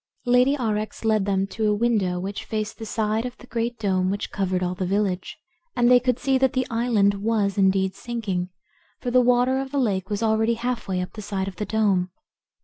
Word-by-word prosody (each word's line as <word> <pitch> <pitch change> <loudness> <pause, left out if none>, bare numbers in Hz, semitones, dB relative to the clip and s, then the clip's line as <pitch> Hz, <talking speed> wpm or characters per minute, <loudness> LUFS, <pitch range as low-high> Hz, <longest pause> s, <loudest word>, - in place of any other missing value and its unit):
Lady 250 +3 +4
Aurex 215 -3 -2
led 215 -3 +2
them 195 -1 +1
to 215 +2 -1
a 210 - +2
window 205 -5 +1
which 195 +2 -5
faced 215 0 -4
the 225 - -6
side 220 +1 0
of 250 0 -6
the - - -14
great 235 0 -2
dome 190 -4 0
which 200 +1 -3
covered 185 -2 -1
all 180 0 -1
the 185 - -4
village, 190 -1 -1 0.4
and 240 0 +4
they 250 - +8
could 250 -1 0
see 265 0 +1
that 265 -1 +2
the 260 -1 0
island 230 -4 +2
was 210 -3 +1
indeed 190 -1 +2
sinking, 200 -4 -3 0.5
for 245 - -3
the 250 +1 +5
water 250 +2 +3
of 270 0 -4
the 285 - -3
lake 195 -7 0
was 210 +1 -2
already 220 +1 +2
half 240 +1 -3
way 185 -1 -1
up 180 - -6
the 215 - -7
side 195 -2 -3
of 190 -2 -7
the 210 - -3
dome. 200 -5 +1
215 Hz, 220 wpm, -24 LUFS, 195-240 Hz, 0.5 s, they